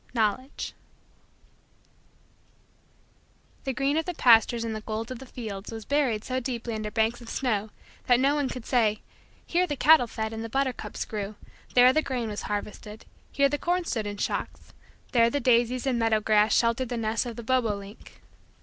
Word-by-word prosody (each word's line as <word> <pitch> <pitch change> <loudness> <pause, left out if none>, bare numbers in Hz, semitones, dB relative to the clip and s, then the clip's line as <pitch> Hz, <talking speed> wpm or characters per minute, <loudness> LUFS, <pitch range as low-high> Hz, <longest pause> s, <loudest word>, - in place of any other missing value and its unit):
KNOWLEDGE 235 +5 -1 2.9
The 265 - -1
green 275 +3 0
of 320 - 0
the 360 - -4
pastures 235 -1 +5
and 225 -1 -3
the 215 - -5
gold 220 +2 -4
of 255 - -6
the 265 - -11
fields 215 -5 -7
was 225 -2 -7
buried 265 -7 +1
so 255 0 -2
deeply 235 -2 -4
under 215 -1 -3
banks 225 +3 0
of 235 - -10
snow 220 -5 -1 0.4
that 245 -1 +5
no 275 +2 +3
one 290 -3 0
could 250 -3 -7
say: 220 -4 +1 0.4
"Here 360 +1 +1
the 290 - -2
cattle 295 -2 +6
fed 220 0 -4
and 225 0 -5
the 225 - -5
buttercups 270 +1 -2
grew; 210 -1 -5 0.4
there 250 +1 +7
the 310 - +3
grain 250 -6 -3
was 210 - -4
harvested; 210 +1 -5 0.3
here 280 0 +3
the 290 +1 -2
corn 350 0 0
stood 220 -9 -2
in 205 0 -5
shocks; - - -4 0.4
there 235 -3 +4
the 285 - -1
daisies 245 -1 +2
and 255 -3 +1
meadow 225 -1 +3
grass 215 0 +3
sheltered 235 +1 +1
the 245 - -3
nest 225 +2 -1
of 235 - -6
the 235 - -7
bobo 230 -3 +1
link." 200 +1 -12
235 Hz, 185 wpm, -27 LUFS, 220-260 Hz, 2.9 s, there